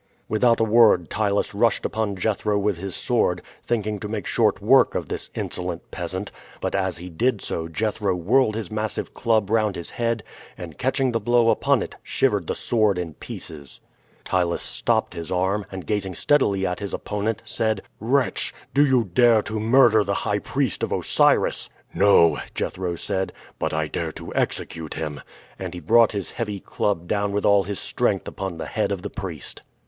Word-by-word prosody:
Without 115 +2 +3
a - - +3
word 110 -6 +5
Ptylus 100 -1 0
rushed 115 +3 +2
upon 110 -2 -1
Jethro 105 +2 0
with 100 -2 0
his 95 +1 -5
sword, - - +1 0.2
thinking 105 -3 -1
to 105 - -5
make 105 -3 -4
short - - +2
work - - +4
of - - -3
this - - -4
insolent 90 -1 -5
peasant; 95 +2 -4 0.3
but - - -2
as 95 -3 0
he 90 +2 -8
did 110 +6 0
so, 80 -3 -4
Jethro 105 +2 -1
whirled 110 +6 +2
his 110 -5 -4
massive 110 -1 -3
club 110 -4 +1
round 110 -3 +2
his 85 - -6
head, 115 -2 -1 0.3
and 85 -3 -9
catching 130 0 +1
the 115 - 0
blow 120 +1 +3
upon 110 - +2
it, - - -9
shivered - - 0
the - - -1
sword 110 -5 +1
in 85 -3 -4
pieces. 70 -2 -8 0.5
Ptylus 90 -2 0
stopped - - 0
his 85 -1 -7
arm, 95 +3 0
and, 95 -1 -7
gazing 100 -4 -2
steadily 100 - +2
at 90 -1 -2
his 100 -1 -3
opponent, 105 +1 -3
said: 110 -3 -1 0.2
"Wretch, 130 +4 0 0.2
do 145 - +5
you 130 -4 +3
dare 115 +3 +4
to 110 0 -3
murder 110 -1 +5
the 100 0 -1
high 105 0 +1
priest 130 0 -1
of - - -1
Osiris?" - - +2 0.2
"No," 95 -4 +5 0.2
Jethro 90 -2 -2
said, 95 +3 -2 0.3
"but - - -1
I - - -1
dare - - -3
to - - -8
execute 80 -2 -2
him," 75 -2 -4 0.4
and 90 -2 -5
he - - -5
brought 115 +7 +4
his 100 -5 -3
heavy 105 -4 -4
club 90 -2 -2
down 100 +1 0
with 105 - 0
all 100 -1 +4
his 100 -1 -4
strength - - 0
upon 95 -3 -5
the - - -5
head - - -1
of 95 -2 -3
the 105 - -5
priest. 90 -8 -6
100 Hz, 185 wpm, -23 LUFS, 90-110 Hz, 0.5 s, word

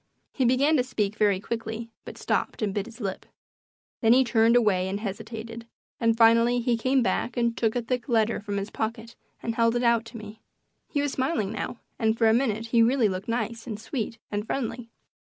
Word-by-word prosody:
He 260 - +1
began 275 +6 +3
to 250 - +2
speak 215 -5 -2
very 205 -3 +2
quickly, 230 +1 -5
but - - -9
stopped - - -1
and 200 -2 -1
bit 205 +1 -2
his 235 +1 -12
lip. 195 -4 -4 0.7
Then 225 -1 +6
he 260 +1 +5
turned 235 -1 +3
away 200 -6 +3
and 200 +1 -3
hesitated, 225 +2 -6 0.3
and 230 -1 +2
finally 230 +1 +5
he 240 0 +1
came 260 +3 +2
back 240 0 -1
and 235 -1 +1
took 225 0 0
a 245 - 0
thick 250 +3 -3
letter 225 -1 +2
from 205 -1 -4
his 200 +1 -4
pocket 225 +1 -4 0.3
and 230 - -1
held 230 0 +2
it 240 - 0
out 235 -1 +3
to 230 +1 -10
me. 215 0 -10 0.5
He 290 - 0
was 290 -1 -1
smiling 260 -7 -1
now, 225 +2 -4 0.2
and 220 0 +1
for 225 - +4
a 220 - +5
minute 225 -3 0
he 230 0 +3
really 235 -1 +3
looked 185 0 -5
nice 230 0 -3
and 215 -3 -5
sweet 230 -1 -4
and 210 +1 -3
friendly. 245 -2 -3
230 Hz, 205 wpm, -26 LUFS, 220-240 Hz, 0.7 s, Then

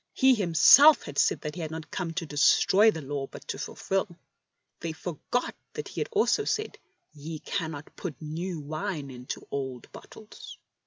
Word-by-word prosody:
He 265 -1 +5
Himself 230 - +7
had 145 -1 -4
said - - +2
that 150 - -5
He 175 - -6
had 160 0 -6
come 180 - -3
not 165 - -7
to 180 - -2
destroy 160 +8 +4
the 160 -8 -3
Law 135 0 -4
but - - -12
to - - -4
fulfil. 195 +1 -2 0.7
They 165 -1 -4
forgot 175 +9 -3 0.2
that 445 0 -6
He - - -5
had - - -3
also 430 - +2
said: 430 0 -2 0.2
" 355 - -50
Ye 155 +2 -7
cannot 155 -1 -5
put 160 -9 -6
new 165 +2 -5
wine 155 -1 -4
into 125 0 -8
old 130 -3 -5
bottles." 215 -1 -12
160 Hz, 175 wpm, -27 LUFS, 145-195 Hz, 0.7 s, Himself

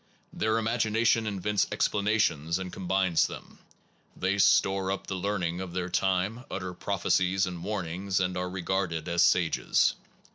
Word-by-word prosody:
Their 110 +1 0
imagination 115 0 +1
invents 105 0 0
explanations 100 -7 +1
and 95 -1 -6
com 95 - -7
bines 95 -3 +2
them. - - -11 0.6
They 100 +2 -1
store 95 -1 +3
up 100 - -3
the - - -4
learning 90 -2 -2
of 90 -2 -6
their 90 -1 -2
time, 95 +6 0
utter 90 -2 -4
prophecies 95 0 +1
and 90 -2 -6
warnings, 95 -1 -2
and 90 -1 -1
are 90 0 -2
regarded 90 -3 -2
as 85 0 +1
sages. 85 -3 +3
95 Hz, 145 wpm, -28 LUFS, 90-100 Hz, 0.6 s, store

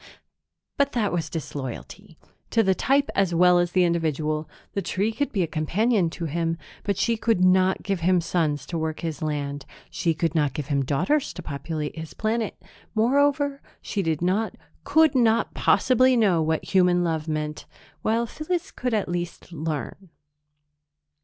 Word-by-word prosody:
But 280 0 +2
that 215 -6 0
was 170 -2 -1
disloyalty 140 -5 -7 0.3
to 225 - +3
the 190 -2 +3
type 275 +9 +1
as 190 -3 +1
well 180 +1 +5
as 175 0 0
the 185 - +4
individual. 155 -2 0 0.2
The 200 - -1
tree 200 +3 -1
could 285 +6 -2
be 195 -4 +1
a - - -1
companion 180 +5 +1
to 170 - -3
him, 165 +1 -1 0.3
but 200 -3 -1
she 235 - +2
could 220 -5 +1
not 185 +1 +3
give 195 -3 -1
him 180 +2 +3
sons 155 -5 -1
to 170 - -3
work 160 0 -3
his 160 -4 -4
land; 145 -2 -3 0.3
she 165 -3 0
could 165 0 0
not 150 -5 +1
give 150 -2 -4
him 140 -2 +1
daughters 180 - 0
to 180 - -8
populate 150 +1 -4
his 160 -1 -8
planet; 220 0 -2 0.4
moreover, 280 +4 +2 0.2
she 205 - -3
did 160 -2 -1
not, 200 +5 0 0.3
could 315 +2 +4
not 230 -3 +2
possibly 255 0 +4
know 195 -7 +3
what 160 0 0
human 180 -1 +4
love 160 -2 -1
meant, 150 -1 -3 0.3
while 230 +2 +1
Phyllis 345 - -3
could 250 -3 -2
at 210 - 0
least 175 0 -5
learn. 160 +3 -5
175 Hz, 165 wpm, -25 LUFS, 155-220 Hz, 0.4 s, well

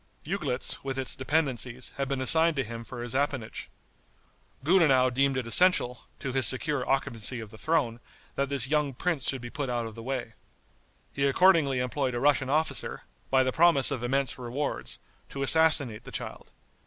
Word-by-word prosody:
Uglitz, 150 -7 -2
with 135 -1 -4
its 130 -1 -3
dependencies, 130 -4 -2
had 135 0 -2
been 135 -1 -3
assigned 160 +4 +6
to 135 - -1
him 115 0 -8
for 120 0 -8
his 120 - -3
appanage. 135 -4 -3 0.9
Gudenow 140 -7 +4
deemed 135 +1 +1
it 130 - -3
essential, 125 -3 +2
to 135 - -5
his 130 -3 +4
secure 135 +1 +1
occupancy 130 -3 0
of 110 -2 -9
the 110 - -12
throne, 140 -8 -1 0.3
that 140 0 -2
this 135 -3 +2
young 150 -2 -1
prince 165 -3 -1
should 130 -2 -3
be 120 0 -8
put 140 -3 -4
out 120 -1 -2
of 110 - -8
the 115 - -10
way. 125 -2 -5 0.8
He 140 0 0
accordingly 155 -3 +3
employed 125 +1 -2
a - - -2
Russian 140 -1 +2
officer, 155 +3 -1 0.3
by 130 -1 +3
the 130 - -1
promise 160 -3 +4
of 130 -4 -3
immense 135 +2 -1
rewards, 125 +4 -3 0.3
to 140 - -5
assassinate 145 -6 +4
the - - -11
child. - - -7
135 Hz, 180 wpm, -27 LUFS, 125-145 Hz, 0.9 s, assigned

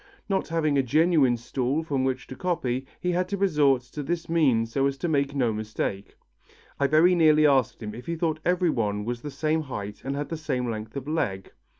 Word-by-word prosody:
Not 195 -1 0
having 155 -4 +1
a - - +5
genuine 145 -1 +3
stool 130 +5 -2
from 140 -5 -1
which 130 -1 -1
to 130 - -9
copy, 135 -8 -2
he 180 - -1
had 180 +2 -1
resorted 145 -10 +2
to 150 - -4
this 165 +4 -3
means 130 -9 +2
so 135 +2 +2
as 135 0 -3
to 175 - -2
make 140 -3 0
no 120 -5 +1
mistake. 105 -2 -4 0.6
I 140 - +3
very 160 +5 +5
nearly 155 -3 +5
asked 135 -5 +2
him 105 0 -5
if 120 +3 -10
he 170 - -1
thought 160 -2 -1
everyone 120 - 0
was 120 0 -3
the 145 - -5
same 155 +3 0
height 105 -8 -6
and 135 +1 -3
had 145 +1 -4
the 165 - -3
same 125 -6 -2
length 110 +3 -6
of 135 0 -6
leg. 100 -12 -2
140 Hz, 210 wpm, -26 LUFS, 120-160 Hz, 0.6 s, a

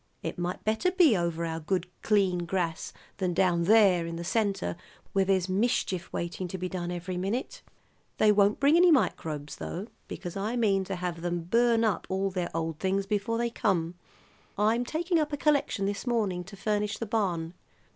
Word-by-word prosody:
It - - -4
might 175 +1 -3
better 220 +12 +1
be 355 - +5
over 170 -2 -1
our 165 0 -3
good 180 +3 -1 0.2
clean 195 -4 +2
grass 175 -1 -2 0.3
than 180 -3 -1
down 175 -2 +2
there 195 -5 +5
in 165 - -5
the 170 - -5
centre 195 - 0 0.4
where 195 -1 +3
there's 190 -1 +2
mischief 190 -2 0
waiting 175 +2 -3
to 190 - -5
be 185 0 -3
done 175 -1 -4
every 180 +1 -4
minute. 200 +8 -3 0.6
They 215 - +5
won't 205 0 +3
bring 285 +3 +5
any 355 +1 +6
microbes, 155 - 0
though, 185 +4 -5 0.2
because 175 -3 -6
I 210 +4 -2
mean 200 -5 +2
to 195 - -3
have 175 -2 -4
them 175 -1 -2
burn 230 +5 +3
up 210 -6 0
all 190 +1 0
their 180 -2 -2
old 165 -2 -2
things 195 +1 0
before 210 +2 -1
they 235 0 -1
come, 180 -8 0 0.6
I'm 220 +4 +2
taking 335 +4 0
up 305 -1 -1
a - - 0
collection 285 -9 +1
this 200 +4 -3
morning 205 -7 0
to 200 +2 -11
furnish 210 0 -1
the 230 - -4
barn. 180 -7 -1
195 Hz, 185 wpm, -28 LUFS, 175-220 Hz, 0.6 s, any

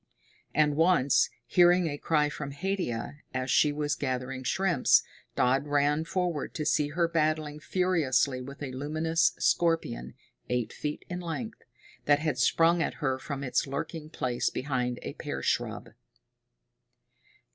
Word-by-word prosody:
And 150 -1 +3
once, 160 -4 +4 0.2
hearing 175 +6 +5
a 145 - -2
cry 150 -2 +2
from 145 -1 -6
Haidia, 145 -7 -3 0.2
as 130 0 -1
she 150 - +4
was 145 0 -1
gathering 130 -1 -3
shrimps, 180 +7 +3 0.3
Dodd 135 +3 +2
ran 145 +2 +2
forward 175 -4 -2
to 155 - -2
see 150 0 +2
her 170 +3 0
battling 155 -2 0
furiously 155 -7 +1
with 140 +3 -8
a 135 - -4
luminous 155 +5 +1
scorpion, 160 - 0 0.3
eight 125 -2 -1
feet 150 0 -5
in 180 0 -4
length, 180 +6 -5 0.4
that 145 0 +5
had 150 -4 -2
sprung 165 +6 +4
at - - -1
her 135 -4 -1
from 140 0 -5
its 130 +1 0
lurking 150 +3 -5
place 125 -5 -1
behind 125 -3 -2
a - - -5
pear - - -5
shrub. - - -1
150 Hz, 140 wpm, -29 LUFS, 135-165 Hz, 0.4 s, hearing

